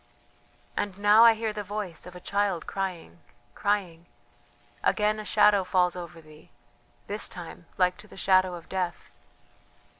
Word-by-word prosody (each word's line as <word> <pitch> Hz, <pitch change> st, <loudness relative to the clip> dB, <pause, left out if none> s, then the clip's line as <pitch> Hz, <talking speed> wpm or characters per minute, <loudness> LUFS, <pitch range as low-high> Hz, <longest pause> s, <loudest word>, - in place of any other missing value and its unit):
"And 195 Hz, -2 st, -3 dB
now 205 Hz, +2 st, +6 dB
I 230 Hz, -1 st, +7 dB
hear 220 Hz, -1 st, -3 dB
the 210 Hz, 0 st, -4 dB
voice 200 Hz, -4 st, -6 dB
of 180 Hz, -, -11 dB
a -, -, -8 dB
child 200 Hz, -2 st, -1 dB
crying, 180 Hz, -, -5 dB, 0.3 s
crying... 180 Hz, -5 st, -2 dB, 0.7 s
again 210 Hz, 0 st, +1 dB
a -, -, -5 dB
shadow 205 Hz, -1 st, +4 dB
falls 180 Hz, -1 st, +1 dB
over 170 Hz, -2 st, -8 dB
thee... 155 Hz, 0 st, -17 dB, 0.6 s
this 210 Hz, +1 st, -2 dB
time 175 Hz, -4 st, -9 dB
like 180 Hz, -1 st, +2 dB
to 215 Hz, -, -13 dB
the -, -, -15 dB
shadow 185 Hz, -1 st, +3 dB
of 170 Hz, -, -11 dB
death." 180 Hz, -2 st, -4 dB
190 Hz, 150 wpm, -27 LUFS, 175-205 Hz, 0.7 s, I